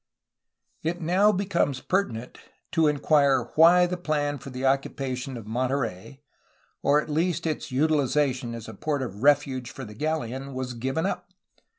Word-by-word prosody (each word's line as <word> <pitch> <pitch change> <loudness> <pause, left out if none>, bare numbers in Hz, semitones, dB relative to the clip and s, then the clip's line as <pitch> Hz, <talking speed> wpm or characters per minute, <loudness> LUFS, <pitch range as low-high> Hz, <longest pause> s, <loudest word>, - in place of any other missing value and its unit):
It 170 +2 -2
now 185 +5 +3
becomes 175 -9 0
pertinent 130 - -2 0.3
to 165 -3 +3
enquire 140 -4 +3
why 175 +3 +7
the 180 0 -3
plan 145 -4 -1
for 140 +2 -9
the 130 0 -6
occupa 135 -1 0
tion 125 0 -6
of 115 - -9
Monterey, 125 +1 -3 0.6
or 145 +1 +4
at - - -4
least 165 +2 0
for 165 - 0
its 155 - -4
utilization 135 -3 +1
as 115 -1 -8
a 110 - -8
port 145 +5 -2
of 105 -4 -7
refuge 140 -3 +2
for 135 - -8
the 105 - -10
galleon, 135 -1 -3
was 130 -1 -3
given 135 +8 -2
up. 180 -2 -3
140 Hz, 165 wpm, -26 LUFS, 125-160 Hz, 0.6 s, why